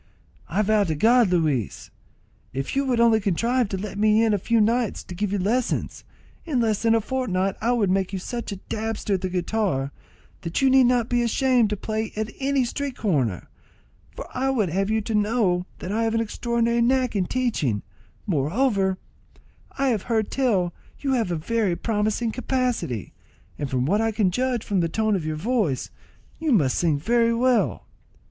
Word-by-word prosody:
"I 200 +6 +1
vow 215 0 +3
to 160 -3 -1
God, 230 +6 +4
Luis, 155 - -1 0.6
if 135 - -3
you 275 0 +1
would 250 -3 +1
only 230 -1 +5
contrive 230 +5 +1
to 195 - -2
let 200 +1 -6
me 215 +1 +4
in 220 - +2
a 205 - +1
few 230 +5 +1
nights 230 +1 +1
to - - -9
give 200 +2 -2
you 205 - 0
lessons, 225 +6 -1 0.4
in 295 -7 -1
less 220 -3 +1
than 225 0 +3
a 225 - +2
fortnight 195 -6 -1
I 235 +3 +2
would 210 -6 +1
make 190 0 0
you 195 - -3
such 235 +5 -5
a - - -3
dabster 215 +1 -3
at 190 - 0
the 185 - -2
guitar, 180 -6 -1 0.5
that 170 -1 -2
you 270 -1 +4
need 265 -1 +6
not 240 -2 +2
be 245 0 +1
ashamed 240 -1 +2
to 210 - -2
play 220 +2 -3
at 215 0 -3
any 275 -1 +1
street 275 +1 -4
corner; 135 - 0 0.7
for - - -7
I 265 +1 0
would 220 -9 +1
have 195 +4 0
you 220 0 +1
to 225 +2 -4
know 205 -4 +1
that 180 - -6
I 225 +2 0
have 225 0 0
an - - +2
extraordinary 235 +1 0
knack 255 0 +2
in 185 -3 0
teaching; 215 - -1 0.4
moreover, 190 - +1 0.8
I 275 0 +2
have 220 -5 0
heard 220 -3 0
tell 215 -10 +1
that 175 - -26
you 275 - 0
have 230 -7 0
a 175 - -1
very 200 +3 0
promising 215 +3 -1
capacity, 245 - -2 0.5
and 145 -2 -3
from 125 -1 0
what 205 +9 +2
I 225 0 +1
can 210 -4 +1
judge 250 +2 -1
from 200 -3 0
the 165 -1 +1
tone 215 +3 +1
of 165 -5 -3
your 155 - -2
voice, 200 - -1 0.5
you 320 -2 0
must 150 - +3
sing 160 -4 +2
very 230 +8 +2
well." 230 - +1
215 Hz, 195 wpm, -24 LUFS, 185-240 Hz, 0.8 s, need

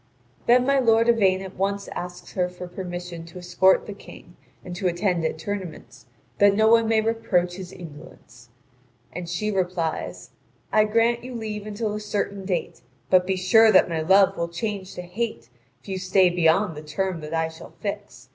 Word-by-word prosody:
Then 250 +1 +5
my 275 0 +3
lord 230 -2 +4
Yvain 195 -5 +3
at 190 0 -9
once 200 +1 -1
asks 180 0 -7
her 180 -1 0
for 180 0 -9
permission 175 -2 -6
to 170 - -12
escort 180 +1 +3
the 205 - -6
King 175 -3 -14 0.3
and 180 - -6
to 185 +1 -1
attend 175 -1 0
at 160 - -1
tournaments, 180 -5 -7 0.3
that 205 0 +5
no 220 +1 +4
one 230 0 +5
may 220 -1 +3
reproach 215 -6 0
his 185 -2 -8
indolence. 150 -8 -13 0.6
And 175 -1 -6
she 210 +5 -2
replies: 180 -4 -3 0.4
"I 215 0 +5
grant 230 +2 +2
you 250 0 -7
leave 215 -2 -5
until 210 0 -3
a 210 - -3
certain 200 -2 -3
date; 180 -3 -3 0.3
but 180 -1 +5
be 190 - +1
sure 215 +5 +5
that 185 - +5
my 165 -1 -1
love 190 +4 +4
will 170 0 -1
change 190 +2 -5
to 180 - -6
hate 180 - -4 0.3
if - - -19
you 190 -1 -3
stay 185 -1 +3
beyond 175 +1 +2
the 150 - -7
term 170 +4 -3
that 155 +2 -5
I 160 0 +1
shall 160 0 -12
fix. - - -6
185 Hz, 185 wpm, -24 LUFS, 175-210 Hz, 0.6 s, Then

